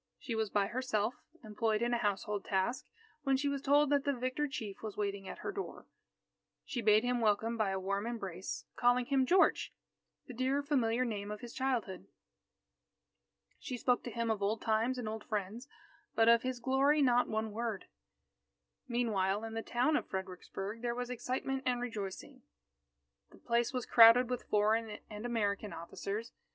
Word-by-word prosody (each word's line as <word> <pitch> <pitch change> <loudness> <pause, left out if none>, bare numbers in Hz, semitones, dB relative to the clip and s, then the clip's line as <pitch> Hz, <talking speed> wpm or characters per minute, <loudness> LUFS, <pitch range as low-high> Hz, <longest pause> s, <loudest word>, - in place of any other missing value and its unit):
She 235 - -5
was 220 -2 0
by 200 -1 +2
herself, 235 -1 -1 0.3
employed 215 +1 0
in 240 0 +1
a 240 - +1
household 205 -1 -1
task, 200 +6 -1 0.3
when 275 -2 +2
she 280 +2 -1
was 280 -1 -1
told 285 +1 +4
that 285 -1 +3
the 285 - +1
victor 255 +4 -1
chief 220 -9 -6
was 215 -2 -6
waiting 200 -2 -2
at - - -6
her - - -1
door. 395 0 -6 0.8
She 240 - -3
bade 215 0 +5
him 245 -1 0
welcome 220 +1 +2
by 215 -3 +1
a 190 0 -1
warm 200 +3 -2
embrace, 195 -6 -5
calling 245 0 +3
him 265 -1 +2
"George," 370 +5 +3 0.5
the 255 - -9
dear 260 +4 0
familiar 255 -4 +1
name 205 -3 -4
of 210 0 -6
his 240 -1 -8
childhood. 245 -8 -2 1.5
She 255 - -5
spoke 245 0 +1
to - - -3
him 230 0 -1
of 215 -2 -2
old 210 +3 0
times 225 +3 +1
and 245 -3 -4
old 220 0 -4
friends, 215 +4 -4 0.5
but 225 0 +4
of 235 0 +7
his 255 -1 -3
glory, 275 +4 +3
not 245 -1 +4
one 220 0 -2
word. 225 -2 -3 1.0
Meanwhile, 215 -5 0
in 225 0 -5
the 225 - -2
town 250 +7 +1
of - - -1
Fredericksburg 190 +3 -5
there 240 -1 -1
was 245 0 -4
excitement 260 +2 -2
and 245 -1 +1
rejoicing. 235 +3 -6 0.9
The - - -17
place 235 +1 0
was 255 -3 -3
crowded 235 +2 +7
with 250 - -4
foreign 215 +1 +2
and 210 +3 -5
American 210 -3 -1
officers. 200 +7 -5
230 Hz, 175 wpm, -33 LUFS, 210-255 Hz, 1.5 s, of